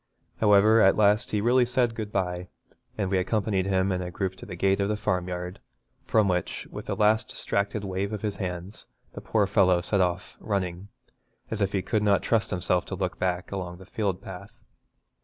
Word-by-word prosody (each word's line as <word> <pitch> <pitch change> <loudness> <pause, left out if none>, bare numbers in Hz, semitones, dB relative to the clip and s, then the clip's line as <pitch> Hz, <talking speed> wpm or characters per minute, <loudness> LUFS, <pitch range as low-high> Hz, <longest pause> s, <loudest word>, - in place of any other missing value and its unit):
However, 105 +1 +5
at 95 - +6
last 105 0 +3
he 105 - 0
really 125 +3 +4
said 120 -1 +1
good 110 -2 -5
bye, 90 -2 -2 0.5
and 100 -3 -1
we 95 - +3
accompanied 100 -1 0
him 95 0 +1
in 90 0 -1
a 90 - -4
group 95 +1 -3
to - - -11
the 90 - -6
gate 95 +3 +2
of 100 0 +1
the 105 - 0
farmyard, 90 -1 -2 0.5
from 110 -2 +3
which, 90 -2 -2
with - - -8
a - - 0
last 110 +1 +2
distracted 100 +1 -2
wave 95 +1 -2
of 105 -1 -5
his 105 -2 -2
hands, 90 +1 -6 0.3
the - - -8
poor 105 -2 +1
fellow 95 -3 +3
set 95 +3 0
off, 90 +1 -2
running, 95 -3 -3 0.6
as 110 -1 -2
if 100 -1 +1
he 95 -2 -1
could 110 - 0
not 100 -2 +3
trust 115 -3 +1
himself 90 0 +1
to - - -5
look - - -3
back, 90 -1 -1
along 90 -3 -5
the 95 - -13
field 100 -2 -2
path. 90 -2 -10
100 Hz, 200 wpm, -26 LUFS, 90-105 Hz, 0.6 s, at